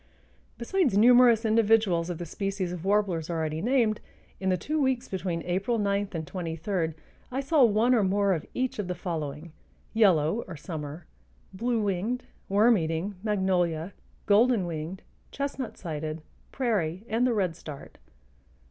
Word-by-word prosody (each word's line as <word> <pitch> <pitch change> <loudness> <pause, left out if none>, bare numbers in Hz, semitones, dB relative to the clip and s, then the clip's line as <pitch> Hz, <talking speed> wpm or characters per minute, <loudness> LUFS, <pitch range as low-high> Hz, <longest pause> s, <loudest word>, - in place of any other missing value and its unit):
Besides 260 - +1
numerous 240 0 +6
individuals 215 -6 +3
of 175 - -3
the 175 - -5
species 195 +1 -3
of 175 -2 -6
warblers 195 -5 +1
already 160 -2 -2
named, 235 -2 +2 0.4
in 190 - -1
the 185 - +2
two 300 - -2
weeks 260 -2 0
between 175 -3 -3
April 195 +7 0
9 200 -1 0
and 160 -2 -3
23 165 0 -3 0.4
I 260 - -2
saw 280 +1 +3
one 230 +2 +4
or 235 - +4
more 200 +1 +2
of 160 - -2
each 255 -3 -1
of 200 - -2
the 180 - -3
following: 160 -3 -5 0.4
Yellow 195 -3 +3
or 175 -4 -7
summer, 155 0 -7 0.5
bluewinged, 225 +1 -1 0.3
worm 210 +2 +5
eating, 165 +5 -2
magnolia, 185 -4 0 0.3
golden 220 -1 +4
winged, 165 +2 -5 0.3
chestnut 280 -3 -4
sided, 155 -1 -5 0.3
prairie, 205 -7 -1
and 235 +3 +1
the 245 - +1
redstart. 165 -7 -4
195 Hz, 140 wpm, -27 LUFS, 170-225 Hz, 0.5 s, numerous